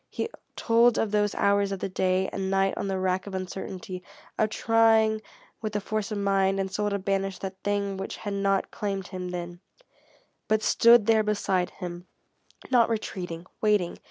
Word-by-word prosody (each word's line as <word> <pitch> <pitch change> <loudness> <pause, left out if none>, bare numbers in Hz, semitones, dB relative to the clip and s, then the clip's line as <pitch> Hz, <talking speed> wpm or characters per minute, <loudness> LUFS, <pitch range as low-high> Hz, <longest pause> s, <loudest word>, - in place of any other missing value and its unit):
He - - -3 0.3
told 235 +1 +4
of 220 - 0
those 210 -1 +1
hours 200 0 +2
of 195 - -2
the - - -2
day 185 0 +1
and 190 -1 -3
night 195 0 +2
on - - -3
the 195 -1 -1
rack 185 +1 -1
of 195 - -5
uncertainty, 185 0 -5 0.3
of 215 - +1
trying 220 -1 +3 0.4
with 215 -1 -3
the 210 - 0
force 215 +1 -3
of 210 - -2
mind 195 -1 +2
and 190 -1 -2
soul 210 +2 0
to 200 - -1
banish 195 -1 -1
that 190 -1 -7
thing 200 -1 -1
which 195 - -5
had 205 -2 -5
not 195 0 0
claimed 195 -2 -3
him 185 -1 -5
then, 175 -1 -6 0.9
but 215 0 +1
stood 235 -2 +6
there 220 0 +4
beside 195 -4 0
him, 175 0 -8 0.6
not 240 -3 +5
retreating, 180 -6 -4 0.2
waiting. 210 -5 +1
195 Hz, 180 wpm, -27 LUFS, 190-215 Hz, 0.9 s, stood